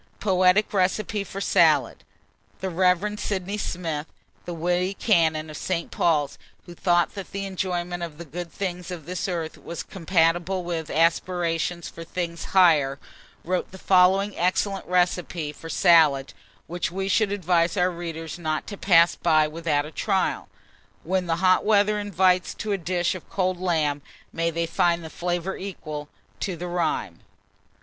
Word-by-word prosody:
POETIC 185 +1 +3
RECIPE 200 +2 0
FOR 195 - -6
SALAD. - - +3 0.6
The 190 - -3
Rev. 185 +4 +1
Sydney 200 +1 -3
Smith, 165 -5 -3 0.4
the 175 - -5
witty 180 +3 0
canon 160 -7 +2
of 150 - -7
St. 170 -2 -3
Paul's, 150 -4 +1 0.3
who 175 - -10
thought 175 0 +1
that 195 -1 -8
an 200 - -2
enjoyment 180 -2 -3
of 165 -3 -6
the 170 - -8
good 170 +3 -7
things 180 -2 -4
of 175 -5 -7
this 180 +3 -3
earth 170 -4 -4
was 170 - -6
compatible 175 +1 +1
with 165 -2 -4
aspirations 170 +1 0
for 165 - -9
things 170 0 -4
higher, 155 -8 +4 0.5
wrote 180 +1 -1
the 190 - -10
following 190 +2 +3
excellent 190 +2 0
recipe 175 -3 0
for 165 +2 -10
salad, 160 -7 +4 0.3
which 175 +1 -3
we 190 +2 -3
should 200 +1 +2
advise 175 -2 +1
our 180 0 +3
readers 165 -1 -6
not 155 -2 -2
to 200 - -7
pass 170 -3 +5
by 155 -2 +3
without 150 -2 -1
a 150 - -9
trial, 195 +2 -1 0.5
when 185 +1 -1
the 165 - +1
hot 185 0 +5
weather 210 0 +3
invites 185 -2 +1
to 215 - -4
a - - +2
dish 175 0 0
of 185 - -10
cold 185 -2 -1
lamb. 155 -5 0 0.3
May 165 0 0
they 170 0 -1
find 170 +1 +1
the 160 - -8
flavour 175 +1 -2
equal 155 -6 -6 0.3
to 185 -4 -3
the 180 +2 -5
rhyme. 165 - -2
175 Hz, 155 wpm, -25 LUFS, 165-185 Hz, 0.6 s, pass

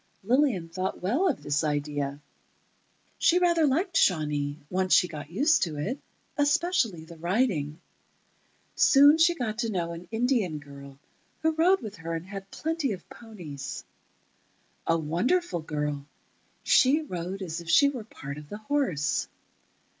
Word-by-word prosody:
Lillian 240 - +2
thought 185 +2 -4
well 260 - +2
of 290 - -3
the 145 - -1
idea. 145 -1 -2 1.0
She 345 - +4
rather 340 -3 +3
liked 335 +6 0
Shawnee, 150 - +1
once 185 +2 0
she 180 - +6
got 150 -3 -8
used 285 - +3
to 160 -5 -1
it, 225 - -3 0.4
especially 290 - +1
the 170 0 -12
riding. 170 - 0 1.0
Soon 290 +3 +6
she 340 +1 +5
got 225 -7 -3
to 230 -2 0
know 175 -5 -2
an 170 +1 -8
Indian 225 - 0
girl, 140 -2 -12 0.5
who 320 - +4
rode 345 +5 +3
with 215 -2 -7
her 165 0 -4
and 165 +1 -5
had 195 0 -8
plenty 315 -4 -2
of 185 - -10
ponies. 175 - -8 1.0
A 165 - +3
wonderful 175 - 0
girl—she 150 - 0
rode 185 - -5
as 170 -1 -4
if 170 - -10
she 280 +12 +6
were 270 -4 -3
a - - -13
part 140 -8 -8
of 150 -1 -13
the 210 - -6
horse. 215 - 0
190 Hz, 145 wpm, -27 LUFS, -, 1.0 s, she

